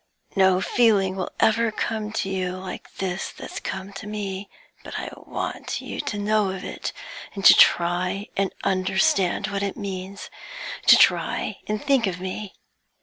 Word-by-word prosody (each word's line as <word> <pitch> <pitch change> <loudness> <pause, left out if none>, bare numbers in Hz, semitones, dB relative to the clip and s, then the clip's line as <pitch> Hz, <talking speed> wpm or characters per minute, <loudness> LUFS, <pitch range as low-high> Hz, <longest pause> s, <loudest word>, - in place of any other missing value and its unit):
No 190 -1 +4
feeling 200 -5 +3
will 185 -2 -3
ever 225 +1 +3
come 215 -1 -3
to 215 - -1
you 185 -1 -1
like 185 0 -8
this 190 -1 -3
that's - - -7
come 195 +1 -5
to 195 +1 -8
me, 200 -2 -4 0.3
but - - -6
I - - -4
want - - -4
you - - -6
to 205 - -4
know 210 -1 +2
of 190 -1 -5
it, - - -4 0.4
to 195 - +8
try 180 +3 +3
and 195 -1 0
understand 190 +1 +2
what 200 0 -2
it 200 +2 -2
means 195 -2 -6 0.6
to - - +10
try - - +2
and 210 0 -2
think 275 -6 +3
of 180 -2 -3
me. 190 +2 -5
195 Hz, 155 wpm, -24 LUFS, 185-210 Hz, 0.6 s, to